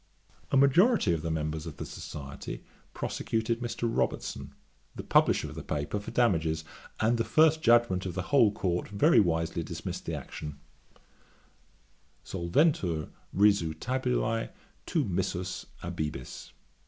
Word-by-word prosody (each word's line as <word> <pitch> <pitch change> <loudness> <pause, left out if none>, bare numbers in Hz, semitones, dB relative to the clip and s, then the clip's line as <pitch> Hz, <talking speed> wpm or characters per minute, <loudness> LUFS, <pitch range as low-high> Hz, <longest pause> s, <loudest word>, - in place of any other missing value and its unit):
A 135 - +4
majority 140 - +5
of 80 - -2
the 85 - -3
members 80 0 -2
of 80 - -8
the - - -5
Society 70 -1 -7 0.3
prosecuted 115 +1 -2
Mr. 120 -1 -4
Robertson, 70 -10 -2 0.4
the - - -6
publisher - - +3
of - - -9
the - - -6
paper, 75 +7 -2
for 100 - -8
damages; 80 -9 +1 0.4
and 115 +2 +2
the - - +3
first 155 +7 +4
judgement 115 -7 +4
of 90 - -5
the 90 - -2
whole 120 -7 +6
Court 90 -3 -1
very 125 - +4
wisely 80 -4 +1
dismissed - - -6
the - - -1
action: 75 -2 -7 1.7
Solventur 85 - +1 0.2
risu 100 -6 +3
tabulae, 125 -3 0 0.4
tu - - +1
missus 95 0 -2 0.2
abibis. 75 -4 -5
95 Hz, 130 wpm, -29 LUFS, 80-120 Hz, 1.7 s, whole